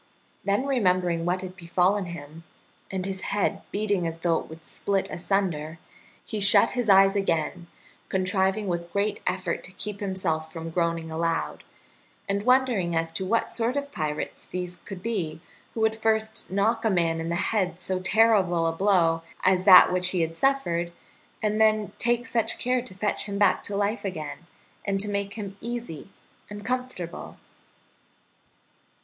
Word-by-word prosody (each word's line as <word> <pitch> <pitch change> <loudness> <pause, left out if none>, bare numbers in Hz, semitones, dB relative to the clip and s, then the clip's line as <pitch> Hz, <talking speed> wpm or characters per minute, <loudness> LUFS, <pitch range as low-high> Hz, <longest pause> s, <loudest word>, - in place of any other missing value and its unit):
Then 200 +6 +1
remembering 180 -10 +1
what 180 +1 0
had 185 0 -7
befallen 185 +3 +1
him, 165 -1 -9 0.5
and 190 -1 -3
his 190 -1 -3
head 205 0 -1
beating 200 -4 0
as 165 0 -4
though 165 -1 +1
it - - -10
would 160 0 -11
split 195 -1 -1
asunder, 170 -4 -1 0.5
he 215 - -4
shut 200 0 +5
his 245 -4 -1
eyes 195 0 +6
again, 170 -2 -1 0.4
contriving 190 +2 +1
with 170 -2 -3
great 205 +1 0
effort 185 -2 -1
to 185 - -10
keep 205 +1 -6
himself 175 -5 -2
from 165 0 -6
groaning 165 -1 -1
aloud, 165 +1 -1 0.6
and 200 0 0
wondering 250 -10 +3
as 165 0 0
to 185 +3 -3
what 230 +3 +1
sort 235 +2 0
of 285 0 -3
pirates 150 - -4
these 180 0 -5
could 190 -2 -8
be 185 -10 -2 0.4
who 225 - -2
would 220 0 +3
first 220 0 0
knock 220 +5 +1
a 225 - +3
man 165 -4 +1
in 165 - -3
the 170 - 0
head 180 -2 0
so 185 0 -1
terrible 185 -4 +3
a 165 - +2
blow 165 -2 +2 0.2
as 185 0 +3
that 185 -2 +9
which 180 0 +2
he 180 -2 0
had 165 0 -1
suffered, 175 -9 +1 0.5
and 215 +1 +1
then 215 -1 +3
take 240 +1 +1
such 230 -3 -1
care 250 0 +1
to 215 -6 -10
fetch 205 +2 -1
him 200 -1 -4
back 205 - +3
to 200 - -4
life 205 +3 0
again, 160 -3 -5 0.4
and 195 -1 0
to 205 - -1
make 200 0 -2
him 200 -3 -6
easy 235 -9 -6 0.4
and 205 0 -8
comfortable. 250 -9 -4
190 Hz, 165 wpm, -26 LUFS, 170-210 Hz, 0.6 s, that